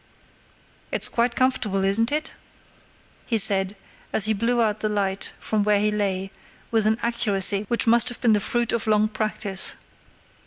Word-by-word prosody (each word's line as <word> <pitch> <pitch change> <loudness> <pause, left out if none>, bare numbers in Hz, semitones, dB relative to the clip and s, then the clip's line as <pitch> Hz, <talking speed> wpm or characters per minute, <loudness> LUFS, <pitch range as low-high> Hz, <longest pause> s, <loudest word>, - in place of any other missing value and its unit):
"It's - - 0
quite 235 0 -1
comfortable, 230 -7 0
isn't 220 +5 +2
it?" 305 +2 -2 0.9
he 230 - +1
said, 195 -2 +3 0.4
as 215 - +3
he 220 - +1
blew 235 +4 0
out 215 -2 +1
the 215 - -1
light 200 -2 -2
from 215 -1 -1
where 205 0 +2
he 210 +1 +1
lay, 195 -2 -2 0.4
with 220 -2 +2
an 220 +1 +2
accuracy 205 -3 +1
which 235 - 0
must 235 +1 +5
have 245 - -8
been 230 -3 +3
the 210 - +3
fruit 235 +3 -1
of 230 -1 -2
long 215 0 +3
practice. 215 -3 -2
215 Hz, 165 wpm, -23 LUFS, 200-235 Hz, 0.9 s, must